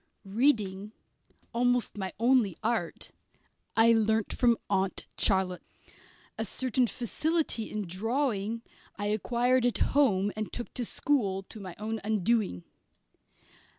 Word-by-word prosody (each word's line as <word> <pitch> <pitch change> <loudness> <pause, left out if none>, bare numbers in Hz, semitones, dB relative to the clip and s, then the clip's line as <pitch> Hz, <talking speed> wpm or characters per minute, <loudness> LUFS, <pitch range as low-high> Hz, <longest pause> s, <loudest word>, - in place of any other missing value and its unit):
Reading, 210 -3 +1 0.6
almost 245 0 +1
my 190 -2 -4
only 235 -6 +3
art, 220 -7 -2 0.7
I 230 +1 +7
learnt 220 -1 +1
from 235 -2 +3
Aunt 190 -1 0
Charlotte; 190 -3 +3 0.8
a - - +1
certain 250 +3 0
facility 265 - -1
in 210 -1 -3
drawing 225 +3 -1 0.3
I 205 - -4
acquired 240 +4 +1
at 245 -1 +2
home 205 -9 +2
and 215 -1 -4
took 240 - -6
to 245 - -2
school, 205 -9 0
to 215 - -9
my 185 -3 -8
own 220 +1 -4
undoing. 210 - 0
220 Hz, 115 wpm, -29 LUFS, 195-245 Hz, 0.8 s, I